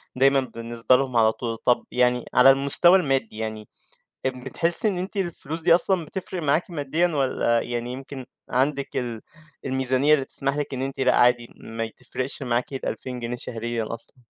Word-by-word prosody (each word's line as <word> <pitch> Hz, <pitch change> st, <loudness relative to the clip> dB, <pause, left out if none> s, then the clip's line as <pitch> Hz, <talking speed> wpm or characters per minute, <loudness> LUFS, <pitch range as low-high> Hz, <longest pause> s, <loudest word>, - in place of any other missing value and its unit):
دايمًا 135 Hz, +1 st, +4 dB
بالنسبة 115 Hz, -1 st, 0 dB
لهم 130 Hz, -2 st, 0 dB
على 110 Hz, -1 st, +5 dB
طول، 115 Hz, -1 st, -5 dB
طب 125 Hz, +1 st, +1 dB
يعني 125 Hz, -1 st, +1 dB
على 125 Hz, +2 st, +7 dB
المستوى 140 Hz, +7 st, +5 dB
المادي 135 Hz, -9 st, -1 dB
يعني، 110 Hz, -1 st, -5 dB, 0.6 s
أ -, -, +3 dB
بتحسّي 135 Hz, -, +3 dB
إن 190 Hz, -3 st, -1 dB
أنتِ 190 Hz, +3 st, -5 dB
الفلوس 165 Hz, -3 st, -4 dB
دي 170 Hz, 0 st, +5 dB
أصلًا 180 Hz, -2 st, +3 dB
بتفرِق 185 Hz, 0 st, -6 dB
معاكِ 155 Hz, +6 st, +1 dB
ماديًا، 155 Hz, +3 st, 0 dB
والّا 130 Hz, -6 st, 0 dB
يعني 120 Hz, 0 st, -4 dB
يمكن 135 Hz, 0 st, -8 dB, 0.2 s
عندِك 135 Hz, +2 st, -1 dB
ال 120 Hz, -3 st, -4 dB, 0.4 s
الميزانية 130 Hz, +2 st, +2 dB
اللي 135 Hz, -3 st, +2 dB
تسمح 135 Hz, +1 st, -2 dB
لِك 145 Hz, -2 st, -3 dB
إن 130 Hz, -, -4 dB
أنتِ 135 Hz, 0 st, -5 dB
لأ 130 Hz, -1 st, +3 dB
عادي 120 Hz, -1 st, +3 dB
ما 115 Hz, 0 st, -5 dB
تفرقش 130 Hz, +2 st, -6 dB
معاكِ 120 Hz, +2 st, -1 dB
ال2000 130 Hz, -1 st, -5 dB
جنيه 120 Hz, +1 st, -4 dB
شهريًا 115 Hz, -1 st, -4 dB
أصلًا؟ 115 Hz, -, -10 dB
130 Hz, 170 wpm, -24 LUFS, 120-140 Hz, 0.6 s, على